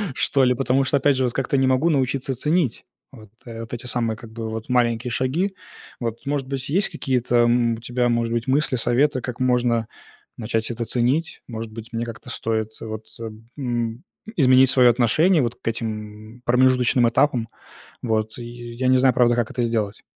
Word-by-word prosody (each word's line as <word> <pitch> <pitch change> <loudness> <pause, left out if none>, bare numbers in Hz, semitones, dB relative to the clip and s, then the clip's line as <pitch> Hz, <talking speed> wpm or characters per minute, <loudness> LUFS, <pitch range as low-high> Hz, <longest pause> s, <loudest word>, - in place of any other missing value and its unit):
что 135 - +2
ли, 125 -1 +4
потому 130 +1 +1
что, 140 +2 +1
опять 140 -1 +2
же, 130 - +1
вот 125 -2 0
как-то 135 +1 0
не 135 0 +3
могу 130 +6 +2
научиться 135 -2 0
ценить 150 -1 0 0.3
вот 110 -6 -14 0.2
вот 115 -1 -8
эти 120 +1 -6
самые 115 -3 -1
как 110 0 -12
бы, 115 -1 -5
вот 110 +1 -6
маленькие 120 -1 +1
шаги. 155 - -1 0.4
Вот, 115 -2 -4
может 140 -1 -2
быть, 135 -1 -4
есть 190 +8 +1
какие-то, 125 -2 -1
м, 120 0 +3
у - - -9
тебя, 120 +1 0
может 115 -1 0
быть, 120 +1 -2
мысли, 135 0 +1
советы, 130 +3 +1
как 125 0 -6
можно 120 -3 +1 0.5
начать 110 -1 -2
это 115 0 -3
ценить? 125 +8 0
Может 115 -2 -6
быть, 115 +1 -10
мне 115 +1 -2
как-то 115 +2 -9
стоит 110 -2 -2
вот, 110 -1 -6 0.5
м, 120 -2 -3 0.3
изменить 130 -3 +5
свое 125 -2 +6
отношение 145 - +3
вот 120 -2 -1
к - - -26
этим 110 0 -5
промежуточным 125 -1 +3
этапам, 120 -1 +1 0.5
вот 110 -1 -1
и, 120 - -7 0.3
я 130 +2 -1
не 130 - +5
знаю, 130 0 +4
правда, 120 0 +3
как 120 -1 -1
это 125 - -1
сделать. 110 -3 -1
120 Hz, 185 wpm, -22 LUFS, 115-130 Hz, 0.5 s, свое